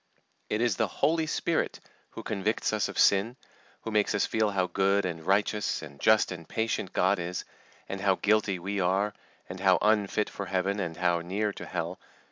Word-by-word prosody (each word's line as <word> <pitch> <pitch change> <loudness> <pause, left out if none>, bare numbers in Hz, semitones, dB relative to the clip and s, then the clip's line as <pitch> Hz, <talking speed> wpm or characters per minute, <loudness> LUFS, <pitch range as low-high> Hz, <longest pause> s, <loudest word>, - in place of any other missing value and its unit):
It 105 - 0
is 120 -1 +1
the 110 - +2
Holy 160 - +1
Spirit 165 +1 -1 0.3
who - - -9
convicts 105 +2 -1
us 110 - 0
of - - -8
sin, 105 +6 +3 0.4
who 110 - -5
makes 105 0 +2
us 100 - +2
feel 110 -1 +1
how 95 -2 +1
good 100 +2 +1
and 85 -3 -4
righteous, 100 +1 +1
and 70 -3 -11
just 110 -2 +4
and 85 -3 -8
patient 110 -4 -1
God 95 +1 +2
is, 90 +1 -4 0.4
and 95 0 -5
how 95 -1 +3
guilty 105 -2 +1
we 100 +3 -3
are, 95 +3 +1 0.3
and 90 +1 -7
how 95 -1 +4
unfit 105 -1 +2
for 100 - -6
Heaven, 95 +2 0
and 85 -4 -3
how 85 -1 +2
near 100 +4 -2
to - - -8
Hell. 85 0 -4
100 Hz, 190 wpm, -28 LUFS, 90-105 Hz, 0.4 s, just